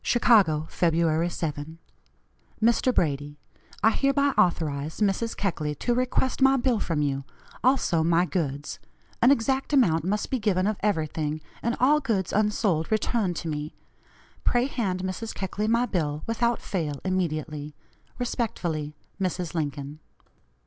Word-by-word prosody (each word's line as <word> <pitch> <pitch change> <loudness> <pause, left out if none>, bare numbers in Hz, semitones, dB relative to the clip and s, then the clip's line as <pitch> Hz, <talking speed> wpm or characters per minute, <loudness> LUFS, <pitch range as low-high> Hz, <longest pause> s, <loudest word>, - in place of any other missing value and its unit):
"CHICAGO, 190 -11 +4
Feb. 165 0 +1
7. 155 0 -4 0.8
"MR. 235 +3 +2
BRADY: 145 -2 0 0.5
I 220 - +6
hereby 280 +3 +2
authorize 155 -4 0
Mrs. 210 +2 0
Keckley 155 -7 -2
to 240 - 0
request 255 +2 0
my 270 0 +6
bill 245 -3 +1
from 155 -6 -1
you; 140 -1 -1 0.4
also 250 -11 +3
my 170 +2 +3
goods. 145 -5 -3 0.4
An 245 - +6
exact 265 +1 +1
account 170 - +4
must 205 +4 -1
be 260 - +1
given 190 -4 +1
of 210 0 0
everything, 155 -5 -1 0.2
and 235 +1 -1
all 290 +4 +5
goods 205 - -1
unsold 210 -5 +1
returned 215 -3 0
to 165 - -5
me. 150 -1 -4 0.7
Pray 245 0 +2
hand 195 -9 -2
Mrs. 190 +4 -4
Keckley 200 +2 -2
my 235 +2 +3
bill, 155 -8 -2
without 235 +1 0
fail, 155 -7 -3
immediately. 155 -5 -2 0.4
"Respectfully, 170 - -2 0.3
"MRS. 180 -2 -2
LINCOLN." 145 -2 -4
185 Hz, 135 wpm, -26 LUFS, 155-230 Hz, 0.8 s, I